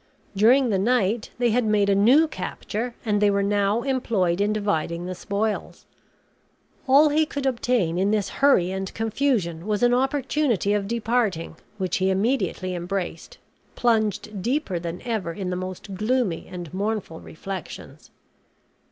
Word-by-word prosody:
During 245 +6 +5
the 195 -3 +1
night 220 0 +1
they 240 -1 +2
had 245 +2 +2
made 210 -2 +2
a 200 - +4
new 250 +11 +5
capture, 235 -5 -5
and 210 -2 +1
they 205 - +5
were 200 0 +1
now 205 +3 +1
employed 210 -9 0
in 205 +1 +2
dividing 175 -5 -1
the 185 - -4
spoils. 205 +3 -3 1.0
All 285 +3 +6
he 305 +2 +3
could 285 -2 -4
obtain 235 -9 +1
in 195 +2 +2
this 210 -2 0
hurry 190 -11 +4
and 190 0 -4
confusion 220 - -1
was 210 +2 0
an 245 0 +4
opportunity 265 - +1
of 205 -1 -1
departing, 225 -7 -1 0.2
which 190 +2 -1
he 190 -1 +1
immediately 190 -2 0
embraced, 175 -1 -4 0.4
plunged 215 -3 0
deeper 240 - -1
than 170 +1 -6
ever 220 -8 -2
in 185 0 -4
the - - -1
most 185 +2 -6
gloomy 215 -2 -1
and 175 -2 -8
mournful 200 -4 -3
reflections. 190 +2 -8
210 Hz, 150 wpm, -24 LUFS, 185-240 Hz, 1.0 s, All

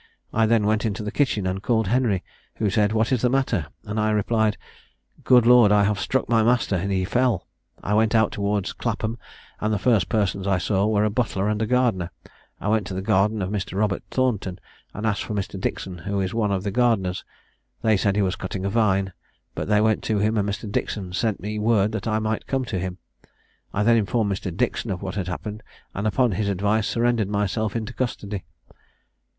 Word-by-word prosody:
I 110 0 +3
then 110 -2 +3
went 110 +1 +1
into 105 -2 -2
the 105 - -3
kitchen, 120 -9 +1
and 95 +1 -2
called 110 +1 +1
Henry, 110 -3 +1 0.3
who 105 -3 0
said 105 +1 +2
'What 110 +1 +1
is 125 -3 +2
the 125 - +3
matter?' 120 - 0 0.2
and 105 +2 -3
I 110 0 +2
replied, 110 0 +1 0.7
'Good 125 -2 +5
Lord, 120 -3 +7
I 105 0 +5
have 105 0 +1
struck 130 - 0
my 115 -2 +3
master, 120 -3 +2
and 95 +3 -1
he 95 -1 +1
fell!' 120 -2 +1 0.4
I 105 - -1
went 110 +1 +3
out 110 -1 +3
towards 100 -1 -1
Clapham, 115 0 -3 0.4
and 110 - 0
the 105 - +1
first 110 -3 +2
persons 100 -2 0
I 95 -2 +3
saw 95 +2 +1
were 105 -1 +2
a 105 - +1
butler 105 -4 0
and 105 0 0
a 110 - 0
gardener. 115 -8 +1 0.5
I - - -4
went 105 -2 +1
to 95 - -5
the 95 - -3
garden 105 0 +2
of 95 - -3
Mr. 95 -2 -3
Robert 105 -1 +1
Thornton, 110 -8 0 0.3
and 105 - -5
asked 105 -2 0
for 105 - -4
Mr. 100 -1 -3
Dixon, 95 -2 -3
who 100 +4 -2
is 95 +1 -1
one 110 -3 +1
of 95 -1 -1
the 100 - -2
gardeners. 100 -6 +1 0.6
They 110 -1 +4
said 100 0 +1
he 105 - +2
was 95 0 0
cutting 95 0 -5
a 100 - -1
vine; 100 -4 +1 0.4
but - - -4
they 105 0 +3
went 110 0 +2
to 110 - +1
him, 105 +2 +1
and 100 -1 +1
Mr. 105 +2 -4
Dixon 100 -2 -3
sent 110 +2 0
me 105 +1 -4
word 105 -1 +2
that 110 0 -4
I 110 -1 +1
might 110 0 -2
come 135 -1 -1
to 100 -6 -3
him. 90 0 -4 0.7
I 105 - 0
then 115 +1 +5
informed 110 0 +1
Mr. 95 0 -4
Dixon 120 -1 -1
of 95 -1 -3
what 95 -2 -4
had 95 -3 -3
happened, 105 +4 -5 0.3
and 100 +2 -2
upon 120 +3 +2
his 100 +1 -1
advice 100 +3 +1
surrendered 115 -3 +1
myself 105 +1 -1
into 110 -2 -3
custody." 105 -6 -4
105 Hz, 215 wpm, -24 LUFS, 100-110 Hz, 0.7 s, Lord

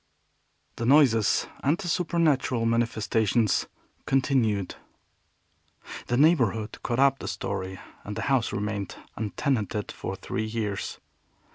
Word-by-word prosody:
The 120 - -2
noises 125 -7 +4 0.2
and 150 +6 +2
supernatural 160 - +1
manifestations 115 -2 +1 0.4
continued. 120 -8 +1 1.3
The 120 - +1
neighborhood 125 - +2
caught 120 - -2
up 135 0 +4
the - - -6
story, 95 0 -4 0.2
and 105 - -6
the 110 - -3
house 130 -4 +1
remained 100 -1 -3 0.2
untenanted 110 -1 -2
for - - -5
three 110 - -3
years. 110 -3 -3
115 Hz, 105 wpm, -27 LUFS, 105-135 Hz, 1.3 s, noises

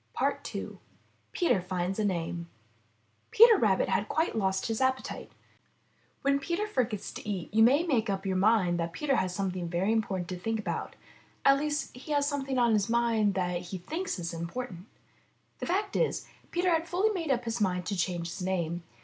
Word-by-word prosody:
II - - -2 0.5
PETER 340 - +2
FINDS 180 +2 -2
A - - +1
NAME 170 -3 -2 0.8
Peter 460 +1 +8
Rabbit 200 -4 +3
had 200 +3 0
quite 320 -3 0
lost 190 -3 0
his 225 +2 -2
appetite. 260 0 -1 0.9
When 280 0 +3
Peter 345 +8 -1
forgets 250 - -2
to - - -7
eat 190 -2 -4
you 220 - +4
may 270 +8 +6
make 245 -10 +1
up 195 0 -2
your 190 -1 0
mind 185 -4 +3
that 170 0 -2
Peter 280 +3 0
has 185 - 0
something 185 -3 -2
very 180 +5 +1
important 195 -5 0
to 180 -1 -4
think 225 +4 -1
about. 170 -6 -4 0.5
At 275 0 +6
least 295 -2 -2
he 280 +4 -5
has 285 -1 +2
something 275 -2 -2
on 240 -2 +4
his 210 0 +1
mind 230 -4 +2
that 180 -2 -1
he 180 +2 -6
thinks 315 - -4
is 170 -1 -4
important. 175 +3 -5 0.7
The - - -4
fact 395 +4 -1
is, 485 - 0 0.2
Peter 355 +1 +1
had 325 0 +1
fully 390 +5 +2
made 340 -7 -3
up 245 -3 +1
his 230 0 -2
mind 180 -3 +1
to 200 - -2
change 175 -2 -1
his 185 - -6
name. 175 -2 -1
215 Hz, 185 wpm, -29 LUFS, 180-275 Hz, 0.9 s, Peter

